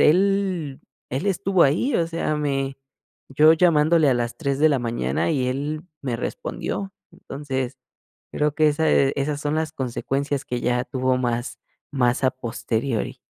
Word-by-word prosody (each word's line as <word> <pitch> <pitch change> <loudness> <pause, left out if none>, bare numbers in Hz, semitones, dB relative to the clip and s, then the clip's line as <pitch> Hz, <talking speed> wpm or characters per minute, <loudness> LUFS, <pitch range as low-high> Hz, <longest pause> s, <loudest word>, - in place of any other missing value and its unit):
él 185 -4 +2 0.3
él 135 +10 -2
estuvo 190 -1 +2
ahí, 165 - +2
o 165 - +2
sea, 165 -2 -2
me 135 -2 -2 0.5
yo 150 +4 +6
llamándole 160 -2 +4
a 130 - +4
las 120 0 -2
3 140 -4 -1
de 155 +2 +5
la 140 - +2
mañana 115 - -1
y 130 -5 0
él 145 +4 -3 0.2
me 125 -4 -2
respondió. 195 - -4 0.2
Entonces, 135 -6 -5 0.6
creo 150 0 0
que 155 -1 +4
ese 145 -2 +3
esas 145 +1 -1
son 150 +1 -1
las 160 0 -1
consecuencias 135 +2 -2
que 125 -1 -3
ya 125 0 +1
tuvo 130 -1 0
más 120 0 -2 0.3
más 125 -1 +1
a 130 - +4
posteriori. 120 -1 -3
140 Hz, 155 wpm, -23 LUFS, 130-155 Hz, 0.6 s, yo